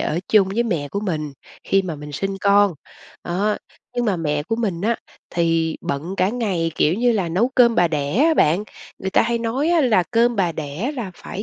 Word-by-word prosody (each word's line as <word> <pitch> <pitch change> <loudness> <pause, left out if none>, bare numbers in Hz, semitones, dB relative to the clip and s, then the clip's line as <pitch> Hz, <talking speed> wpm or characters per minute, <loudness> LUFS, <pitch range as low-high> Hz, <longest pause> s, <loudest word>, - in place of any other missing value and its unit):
ở 160 - -1
chung 200 -3 +4
với 225 +5 0
mẹ 165 -11 -2
của 200 - -3
mình 155 -8 -3 0.3
khi 195 0 +2
mà 170 -4 -5
mình 150 0 -9
sinh 195 +5 -3
con, 200 -2 +4 0.5
đó. 200 +5 0 0.4
Nhưng 245 - +1
mà 205 -5 +1
mẹ 150 -3 -1
của 225 +8 -2
mình 195 -8 -2
á 230 +3 +1 0.3
thì 165 -1 +1
bận 160 +7 -4
cả 185 0 +2
ngày, 200 -8 -1
kiểu 155 - +2
như 240 +3 +2
là, 190 -6 0
nấu 195 +9 +1
cơm 235 -2 +5
bà 175 - +3
đẻ 145 -2 -2
á 325 - +4
bạn. 175 - +3 0.3
Người 190 - -3
ta - - +4
hay 235 +1 0
nói 240 +7 -1
á 345 -2 +4
là 225 -9 +3
cơm 235 0 +3
bà 180 -4 +1
đẻ 155 - -4
là 225 -7 -4
phải 200 +3 -7
195 Hz, 220 wpm, -21 LUFS, 165-230 Hz, 0.5 s, cơm